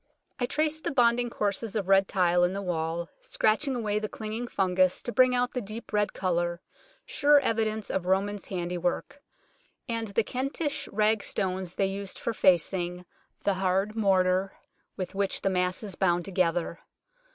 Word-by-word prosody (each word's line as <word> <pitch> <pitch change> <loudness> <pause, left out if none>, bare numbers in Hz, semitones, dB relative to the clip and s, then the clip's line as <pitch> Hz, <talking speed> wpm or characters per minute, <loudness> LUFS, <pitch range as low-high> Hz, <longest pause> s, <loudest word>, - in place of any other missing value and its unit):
I 245 - 0
traced 310 +2 0
the - - 0
bonding 240 -2 +3
courses 210 0 -2
of 200 -4 -1
red 195 0 +5
tile 175 -2 +2
in 175 +1 +2
the 200 - -3
wall, 170 -1 -2
scratching 260 +5 +1
away 210 -3 -1
the 215 0 -4
clinging 220 +2 -5
fungus 185 -3 +1
to 240 - -3
bring 255 0 +4
out 245 0 +1
the 250 - -3
deep 215 +2 -8
red 210 0 +2
colour, 175 -2 -1 0.5
sure 290 0 +4
evidence 220 -4 0
of 180 -1 -2
Romans' 195 +1 0
handiwork, 180 +8 -3 0.7
and 230 -2 -2
the 205 +3 +1
Kentish 280 +4 -3
rag 215 0 +1
stones 185 -2 -2
they 195 - +2
used 195 0 -4
for 230 - -2
facing, 180 -2 +2 0.4
the 200 - +2
hard 190 +3 0
mortar 190 -2 +2 0.4
with 185 -2 -4
which 195 0 -1
the 195 - +1
mass 180 +2 0
is 200 -3 -4
bound 175 -1 +1
together. 175 -2 0
195 Hz, 165 wpm, -28 LUFS, 185-225 Hz, 0.7 s, red